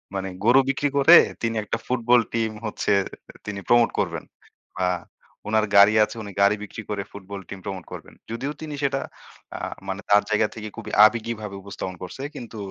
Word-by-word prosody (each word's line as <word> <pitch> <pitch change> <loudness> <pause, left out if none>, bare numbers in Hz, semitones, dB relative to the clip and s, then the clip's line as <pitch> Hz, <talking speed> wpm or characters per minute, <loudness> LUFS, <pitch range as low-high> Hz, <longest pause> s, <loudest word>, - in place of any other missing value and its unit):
মানে 95 0 -2 0.2
গরু 125 +3 +7
বিক্রি 140 +1 +1
করে 140 +5 +8 0.3
তিনি 115 -1 -1
একটা 105 - -2
Football 125 -1 +3
team 115 -1 0
হচ্ছে 110 - -2 0.5
তিনি 105 -1 -5
promote 120 -1 +4
করবেন। - - -2 0.6
আ - - +2 0.6
উনার 110 0 +3
গাড়ি 100 +1 +8
আছে 105 - -3
উনি 100 - -8
গাড়ি 100 +1 +5
বিক্রি 105 +2 -8
করে 105 -1 -2
Football 100 0 -8
team 100 - -7
promote 95 -3 -6
করবেন। - - -9 0.2
যদিও 125 +5 -3
তিনি 155 -1 -6
সেটা 135 0 +1 0.6
আ - - -7 0.3
মানে 95 +1 -4
তার 105 0 +6
জায়গা 110 0 +2
থেকে 110 -1 -6
খুবই - - -7
আবেগীভাবে 110 -2 -1
উপস্থাপন 95 -1 -6
করছে, 90 +8 -8
কিন্তু 115 -2 -8
110 Hz, 175 wpm, -24 LUFS, 100-120 Hz, 0.6 s, করে